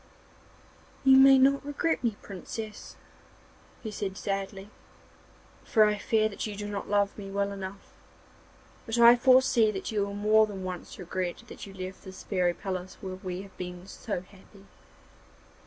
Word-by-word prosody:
'You 265 0 +7
may 270 0 +8
not 275 +1 +4
regret 290 +1 -1
me, 230 -3 0
Princess,' 210 +2 -8 0.9
he 220 - -5
said 200 -2 -4
sadly, 195 0 -4 0.9
'for 220 - +4
I 210 0 0
fear 220 -1 +2
that 215 +1 -5
you 210 - -6
do 205 +1 -5
not 205 -1 -5
love 200 -1 +1
me 195 -1 -7
well 200 0 -1
enough; 195 0 -8 0.9
but 225 +1 -1
I 235 0 +9
foresee 255 -2 +5
that 200 0 -4
you 210 -2 +1
will 200 0 -4
more 215 +1 +4
than 195 -3 -7
once 180 -1 -6
regret 180 -1 -4
that - - -9
you 195 - -11
left 185 0 -7
this 190 -1 -10
fairy 180 -3 0
palace 185 -1 -5
where 190 -3 -6
we 185 0 -5
have 195 - -15
been 180 0 -7
so 200 -1 -5
happy. 195 +1 -18
200 Hz, 160 wpm, -28 LUFS, 190-220 Hz, 0.9 s, I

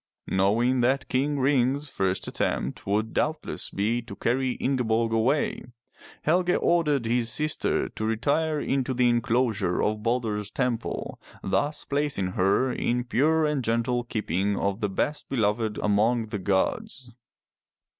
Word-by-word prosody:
Knowing 115 +7 +2
that 130 +3 +1
King 145 +3 0
Ring's 135 +1 +2
first 95 -7 -1
attempt - - -2
would 110 +3 0
doubtless 155 +1 -2
be 110 +5 0
to 115 -4 -10
carry 130 +3 0
Ingeborg 115 -4 0
away, 115 +7 +1 0.6
Helge 180 +3 +2
ordered 150 -7 +2
his 115 0 +1
sister 150 +5 0
to 110 - -5
retire 145 +8 +1
into 135 -2 -1
the 125 0 +3
enclosure 115 -6 +1
of 105 0 0
Balder*s 110 -3 -1
temple, 125 -2 -3 0.2
thus 145 +10 -1
placing 140 -10 -1
her 100 +8 +2
in 120 0 0
the 125 - -1
pure 155 +6 +2
and 150 -3 0
gentle 115 +2 0
keeping 100 -3 -1
of 100 +1 -1
the 105 - -1
best 145 +9 -2
be - - -2
loved 105 0 0
among 110 +3 +2
the 105 -2 -3
gods. 125 - -1
120 Hz, 140 wpm, -26 LUFS, 105-140 Hz, 0.6 s, the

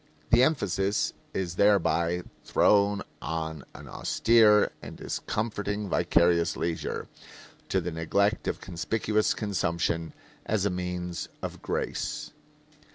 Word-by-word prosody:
The 120 - +7
emphasis 100 - +1 0.2
is 90 -2 -3
thereby 90 -4 +3 0.2
thrown 100 -1 +3 0.2
on 80 -1 -4
an - - -10
austere 110 -2 +4
and - - -9
discomforting 105 -2 -3
vicarious 85 -1 +3
leisure, 85 -1 -3 0.6
to 95 - +2
the 90 0 -3
neglect 100 +7 0
of - - -1
conspicuous 105 +4 0
consumption 85 -5 -1 0.3
as 105 -2 0
a 100 - +1
means 90 -1 -4
of - - -5
grace. - - -3
95 Hz, 105 wpm, -28 LUFS, 85-105 Hz, 0.6 s, The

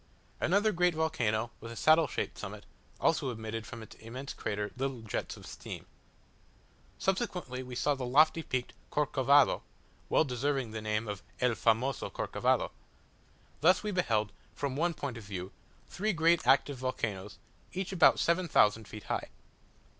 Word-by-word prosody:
Another 205 +5 +3
great 180 -2 +2
volcano, 120 -8 0
with 115 +1 -8
a - - -7
saddle 155 +4 +5
shaped - - -3
summit, - - -7 0.3
also 135 - +2
emitted 110 -1 -5
from 115 -3 -8
its - - -13
immense 125 +5 -7
crater 105 -1 -3
little 130 -2 -3
jets 110 - -4
of - - -12
steam. - - -8 1.1
Subsequently 185 - -1
we 125 -1 -7
saw 145 +4 +2
the 135 -2 -5
lofty 155 +6 +4
peaked 125 -5 -3 0.2
Corcovado 140 -1 +4 0.5
well - - +4
deserving 135 -2 -1
the 110 0 -5
name 110 +1 -1
of 105 -2 -4 0.2
"el 125 -1 +3
famoso 115 +3 +1
Corcovado." - - 0 0.9
Thus 180 +7 +4
we 210 - -1
beheld, 110 - +1 0.2
from 140 -2 -2
one 170 +3 +1
point 140 -6 -4
of 115 - -8
view, 95 -2 -6 0.4
three 215 +3 -1
great 165 -4 +3
active 135 +1 +4
volcanoes, 105 -6 -3 0.3
each 190 +1 -3
about 190 - +6
seven 175 +1 +2
thousand 105 -6 +4
feet 105 - -9
high. - - -2
130 Hz, 155 wpm, -31 LUFS, 110-160 Hz, 1.1 s, about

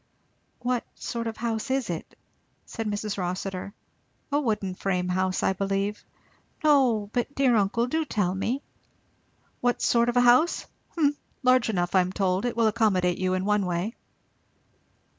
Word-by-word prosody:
"What 245 -1 0
sort 230 -1 -4
of 225 - -4
a - - -12
house 230 +1 -2
is 265 -2 0
it?" 165 - -7 0.5
said 225 -2 -5
Mrs. 210 0 -3
Rossitur. 185 +1 -3 0.6
"A 290 +1 +2
wooden 210 -7 -1
frame 180 -1 -1
house, 185 0 0
I - - +3
believe." 195 +2 -2 0.6
"No 250 -9 +3
but, 245 +3 -1
dear 265 -3 +3
uncle, 215 +3 +2
do 320 +6 0
tell 205 - 0
me." 235 +9 -2 1.0
"What 245 0 +1
sort 235 0 +3
of 240 - 0
a - - +6
house? 250 +8 +4 0.3
Humph 290 -2 +2 0.3
Large 255 -2 +4
enough, 175 -4 -1
I 190 - +6
am 180 0 -2
told. 190 +1 0
It 245 - -2
will 230 - +3
accommodate 205 -5 +2
you, 185 0 +1
in 185 +1 -2
one 210 -2 +2
way." 180 +6 -2
215 Hz, 160 wpm, -26 LUFS, 190-245 Hz, 1.0 s, a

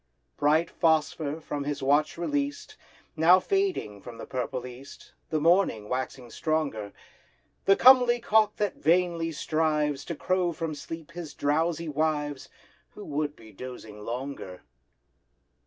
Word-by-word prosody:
Bright 155 +3 +2
Phosphor, 160 -2 +1
from 145 -2 -4
his 145 -2 -3
watch 145 +4 +2
released, 285 - -2 0.4
Now 170 +3 +6
fading 380 - -1
from 120 +1 -10
the - - -7
purple 125 0 -3
East— 125 +2 -12 0.2
The 155 - 0
morning 160 - +2
waxing 125 -1 -4
stronger; 140 -11 -2 0.7
The 195 - +6
comely 245 -1 +7
cock 215 -2 +3
that 205 -1 -1
vainly 170 0 +2
strives 150 -2 0
To 170 - -4
crow 180 +2 0
from 160 0 -3
sleep 165 +2 -8
his 170 -3 -8
drowsy 165 +3 0
wives, 150 -2 -1 0.5
Who 210 - -9
would 150 0 -2
be 110 -1 -15
dosing 110 -1 -9
longer. 120 -6 -6
155 Hz, 130 wpm, -27 LUFS, 135-170 Hz, 0.7 s, comely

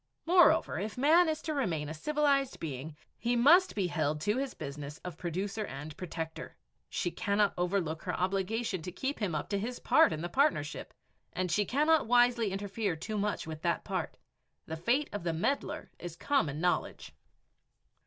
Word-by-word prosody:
Moreover, 335 -2 +4
if 210 +4 -4
man 320 +6 +5
is 310 - -2
to 310 - -2
remain 175 - -1
a 155 - -5
civilized 280 - +1
being, 150 0 -6 0.2
he 240 +2 0
must 330 +10 +5
be 200 -3 +1
held 155 -3 -1
to 210 +6 +1
his 270 0 -3
business 145 0 -7
of 180 -4 -5
producer 190 +6 -3
and 150 -3 -7
protector. 160 -3 -6 0.3
She 175 - -2
cannot 205 0 +1
overlook 175 -3 -1
her 180 - -3
obligation 195 +2 -1
to 180 - -6
keep 270 +9 -3
him 195 -7 -1
up 150 - -2
to 200 -1 0
his 240 +4 -4
part - - +5
in 155 -1 -3
the - - -1
partnership, 175 - 0 0.4
and 180 -1 -2
she 205 +5 +2
cannot 300 - +3
wisely 240 -3 +4
interfere 200 -1 -2
too 205 +7 -4
much 205 +1 -1
with 160 -1 -7
that 170 0 0
part. - - -3 0.5
The 160 - -5
fate 240 - +1
of 205 - -3
the 170 -1 -1
meddler 225 - -2
is 175 -2 -7
common 165 - 0
knowledge! 180 +1 -1
195 Hz, 175 wpm, -31 LUFS, 160-250 Hz, 0.5 s, man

